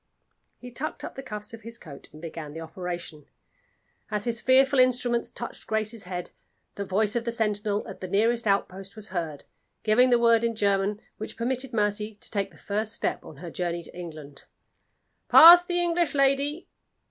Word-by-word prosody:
He 245 0 -11
tucked 285 +6 -4
up - - -6
the 270 - -7
cuffs 210 -4 -7
of 230 - -9
his 230 +1 -7
coat 140 -9 -12
and 155 - -13
began 155 -2 -7
the 160 - -7
operation. 165 -2 -7 0.8
As 210 -1 -2
his 235 -1 -1
fearful 265 +1 +4
instruments 245 -2 +2
touched 235 - -8
Grace's 220 -1 -2
head, 180 -1 -5 0.4
the 200 - -4
voice 210 +3 0
of 235 - 0
the 235 - -2
sentinel 210 -2 -1
at - - -10
the 185 - -4
nearest 225 +4 +1
outpost 195 0 -1
was 215 -1 -7
heard, 165 -6 -4 0.4
giving 240 +4 +4
the 245 - +5
word 230 -1 +4
in 230 -1 0
German 200 0 +1 0.2
which 220 - -7
permitted 255 +2 -1
Mercy 210 -1 -1
to 235 - -8
take 200 -2 -1
the 165 - -20
first 215 +6 -3
step - - -2
on - - -12
her 170 +2 -8
journey 175 -1 -3
to - - -12
England: 155 -5 -9 0.8
"Pass 345 +2 +10
the 350 0 0
English 345 -3 +1
lady!" 280 +4 +1
215 Hz, 180 wpm, -26 LUFS, 185-240 Hz, 0.8 s, Pass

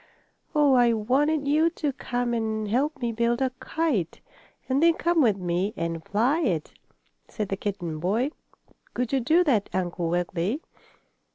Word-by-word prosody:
"Oh, 295 -2 +5
I 240 -2 +5
wanted 280 +7 +1
you 310 +3 +4
to 300 -4 -3
come 245 -1 -2
and 220 -2 -1
help 280 +8 0
me 240 -2 -1
build 235 +1 0
a 260 -1 +1
kite, 295 - -1 0.5
and 270 +2 +1
then 335 0 +5
come 340 -1 +2
with 220 -7 +3
me 180 +3 -1
and 165 -1 -3
fly 240 - +1
it," 180 - -1 0.5
said 210 -2 -4
the 195 - -1
kitten 185 -6 -4
boy. 220 - 0 0.6
"Could 250 +1 -2
you 270 - +3
do 320 +8 +3
that, 235 - +1
Uncle 175 -2 -1
Wiggily?" 175 - -1
235 Hz, 160 wpm, -26 LUFS, 195-285 Hz, 0.6 s, Oh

